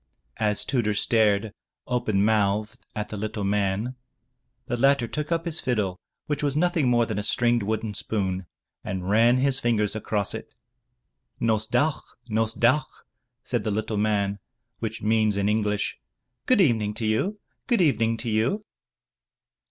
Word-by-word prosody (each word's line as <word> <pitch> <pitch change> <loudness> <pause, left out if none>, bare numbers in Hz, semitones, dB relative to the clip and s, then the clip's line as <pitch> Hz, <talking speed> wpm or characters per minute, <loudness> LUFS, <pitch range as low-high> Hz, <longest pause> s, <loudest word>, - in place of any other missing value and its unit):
As 105 -1 +2
Tudur 110 -5 0
stared, 105 -1 +2 0.3
open 110 -5 +1
mouthed, 105 -1 +1 0.2
at 105 0 -3
the 105 - -5
Uttle 105 0 -3
man, 100 +4 0 0.7
the - - -2
latter 135 0 +3
took 150 +5 -4
up 165 0 0
his 165 -1 -2
fiddle 105 -8 -1 0.3
which 150 -1 -2
was 145 -1 0
nothing 165 -5 +2
more 120 -1 +3
than 110 -3 -3
a - - 0
stringed 120 +3 +2
wooden 110 +1 -2
spoon 95 -3 -2 0.4
and 95 -1 -4
ran 115 +3 +5
his 135 0 +2
fingers 110 -4 +1
across 105 -2 -1
it. 110 - -8 0.8
"Nos 110 -1 +1
dawch! 145 +6 +1 0.3
Nos 110 0 0
dawch!" 130 +4 +1 0.4
said 120 -4 -1
the 110 - -1
little 110 +1 -2
man, 100 -1 0 0.4
which 110 0 -4
means 110 -1 +2
in 100 0 +1
English, 105 -1 0 0.5
*'Good 255 -5 +5
Evening 110 - +2
to 115 - -3
you! 175 - 0 0.3
Good 240 -6 +3
Evening 115 -8 +2
to 120 - -3
you!" 125 - 0
110 Hz, 150 wpm, -25 LUFS, 105-125 Hz, 0.8 s, ran